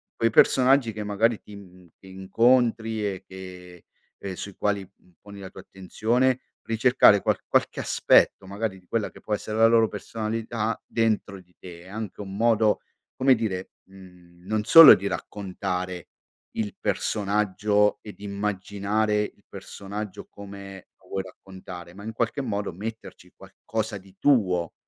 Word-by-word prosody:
quei 115 - +1
personaggi 130 +1 +4
che 105 0 -5
magari 105 +2 0
ti 105 - -13
n 90 -3 -16
che 95 - -17
incontri 110 +3 +1
e 95 -2 -4
che 90 -2 -11 0.4
ehm, 95 -2 -6
sui 100 +1 -8
quali, 100 -1 -1
mhmm, 90 -2 -29
poni 100 -1 -12
la 95 - -8
tua - - -13
attenzione, 120 +7 0 0.2
ricercare 115 -3 +4
qual - - +1
qualche - - 0
aspetto - - +3
magari 100 0 -4
di 90 - -27
quella 115 -3 -2
che - - -15
può 105 - -4
essere 110 +1 -3
la 115 - +6
loro 115 -1 +4
personalità 110 +1 -4
dentro 110 -4 -1
di 90 -1 -28
te. 85 -2 -11
È - - -16
anche 105 -1 -6
un 95 -1 -8
modo, 110 -2 +3 0.4
come 130 0 +4
dire, 100 -5 -4 0.2
mhmm, 90 -2 -17
non 110 0 0
solo 165 +7 +10
di 100 - -7
raccontare 90 -2 -5 0.5
il 105 -3 -4
personaggio 105 0 0
e 105 - -9
di - - -16
immaginare 105 +1 -1
il 105 -1 -7
personaggio 100 +1 -8
come 100 -1 -11
lo - - -24
vuoi 95 - -3
raccontare, 90 -2 -11
ma, 100 - -12
in 110 - -5
qualche 120 +5 -2
modo, 105 -7 -3
metterci 110 +5 -8
qualcosa 110 -1 -5
di 95 0 -20
tuo. 90 - +2
105 Hz, 155 wpm, -25 LUFS, 95-110 Hz, 0.5 s, solo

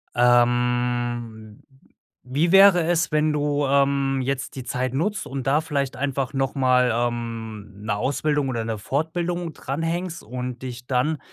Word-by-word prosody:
Ähm, 120 -2 +1 0.6
wie 145 +7 0
wäre 195 -2 +7
es, 170 -1 +1
wenn 155 0 +2
du, 145 -1 0
ähm, 140 -1 +2
jetzt 135 +1 -3
die 130 - -6
Zeit 130 0 -2
nutzt 195 +9 -1
und 135 -1 -5
da 145 +3 +3
vielleicht 140 -5 -2
einfach 135 0 -2
noch 135 -1 -1
mal, 125 -2 +3
ähm, 115 -3 -3
'ne 105 -1 -1
Ausbildung 145 +4 0
oder 115 -3 -2
'ne 110 -1 -3
Fortbildung 170 - -2
dran 140 +2 -4
hängst 170 +1 -3
und 125 +1 -6
dich 125 -1 -7
dann 135 +4 0
135 Hz, 150 wpm, -23 LUFS, 120-150 Hz, 0.6 s, wäre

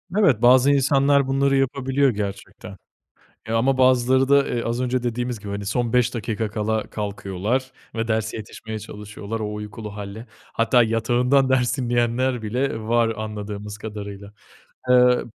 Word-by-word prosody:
Evet, 185 - +3
bazı 130 +3 +6
insanlar 140 0 +3
bunları 135 +1 +2
yapabiliyor 135 +1 +1
gerçekten. 100 -4 -6 0.7
Ya 115 - 0
ama 130 +3 +2
bazıları 130 +1 +4
da, 140 0 +4
eee, 120 - -2
az 115 +1 -2
önce 125 0 -1
dediğimiz 120 0 -2
gibi, 100 - -9
hani, 100 0 -5
son 115 +2 -1
5 125 0 +2
dakika 110 -2 -3
kala 110 0 -1
kalkıyorlar 105 +5 -3 0.2
ve 115 0 -2
derse 110 -1 -1
yetişmeye 110 0 -7
çalışıyorlar, 105 +1 -7
o 105 -1 -3
uykulu 105 0 -7
hâlle. 105 +3 -7 0.3
Hatta 120 +2 +3
yatağından 120 +4 +2
ders 130 0 +1
dinleyenler 120 0 0
bile 115 +2 -2
var 115 +1 +2
anladığımız 105 -1 -6
kadarıyla. 100 -2 -8 0.6
Eee, 125 0 +5
115 Hz, 145 wpm, -22 LUFS, 105-130 Hz, 0.7 s, bazı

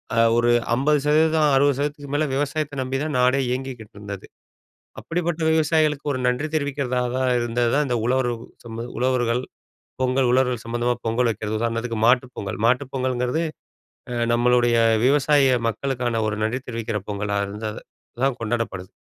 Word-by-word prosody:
அ - - -1 0.2
ஒரு 120 0 +3 0.3
50%, 150 +3 +3
60%க்கு 145 +1 +1
மேலே 155 - +2
விவசாயத்த 145 0 -2
நம்பிதான் 135 +3 -2
நாடே 130 +2 +3
இயங்கிக்கிட்டு 125 -5 -5
இருந்தது. 100 -1 -7 0.7
அப்படிப்பட்ட 170 -1 -2
விவசாயிகளுக்கு 155 -2 +2
ஒரு 130 - -3
நன்றி 125 +5 0
தெரிவிக்கிறதா 140 -4 -1
தான் 130 -1 +1
இருந்ததுதான் 120 +4 +1
இந்த 120 - 0
உழவர் 130 0 +1 0.3
சம 115 0 -6
உழவர்கள் 125 -1 +1 0.6
பொங்கல் 130 0 +2
உழவர்கள் 125 -2 +1
சம்மந்தமா 120 +1 0
பொங்கல் 120 +2 +1
வைக்கிறதுதான். 110 0 -3
உதாரணத்துக்கு 115 0 -2
மாட்டு 125 +1 +4
பொங்கல். 100 0 -5
மாட்டு 125 +4 +2
பொங்கல்ங்கிறது 130 +4 0 0.7
அ 120 - -3 0.2
நம்மளுடைய 120 0 +3 0.3
விவசாய 135 -2 +4
மக்களுக்கான 120 -1 -2
ஒரு 105 -1 -2
நன்றி 120 +4 -2
தெரிவிக்கிற 115 -3 -3
பொங்கலா 100 0 -2
இருந்தது 105 +2 -6 0.4
தான் 135 -2 +1
கொண்டாடப்படுது. 110 -5 -3
125 Hz, 130 wpm, -23 LUFS, 115-140 Hz, 0.7 s, மாட்டு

